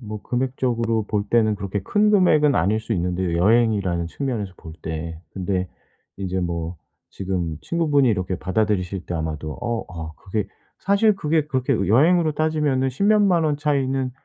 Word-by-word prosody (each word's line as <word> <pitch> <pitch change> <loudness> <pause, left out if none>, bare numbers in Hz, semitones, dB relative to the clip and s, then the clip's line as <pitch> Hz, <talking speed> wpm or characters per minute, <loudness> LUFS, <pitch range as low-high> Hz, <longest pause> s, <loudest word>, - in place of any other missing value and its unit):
뭐 105 -3 -7
금액적으로 120 -3 -1
볼 105 -1 -1
때는 110 -2 +3
그렇게 100 0 -3
큰 210 - +2
금액은 155 -8 +4
아닐 100 +4 +2
수 110 - -4
있는데요 90 -2 -1
여행이라는 100 -4 +2
측면에서 110 -2 -3
볼 80 - -11
때. 80 0 -5
근데 95 -1 -2 0.5
이제 95 -1 -3
뭐 85 -1 -3 0.3
지금 90 -5 -3
친구분이 150 -6 +2
이렇게 95 -4 -1
받아들이실 95 -2 -1
때 90 - -4
아마도 80 -1 -3
어 120 -2 -2
아 80 -3 -7
그게 100 +1 -3 0.3
사실 200 +2 +3
그게 155 -3 0
그렇게 130 -2 0 0.2
여행으로 155 - +4
따지면은 150 -4 +1
10 130 +10 -2
몇 215 +1 +5
만 180 -5 +3
원 150 -2 +1
차이는 135 -3 0
110 Hz, 345 characters per minute, -22 LUFS, 90-145 Hz, 0.5 s, 몇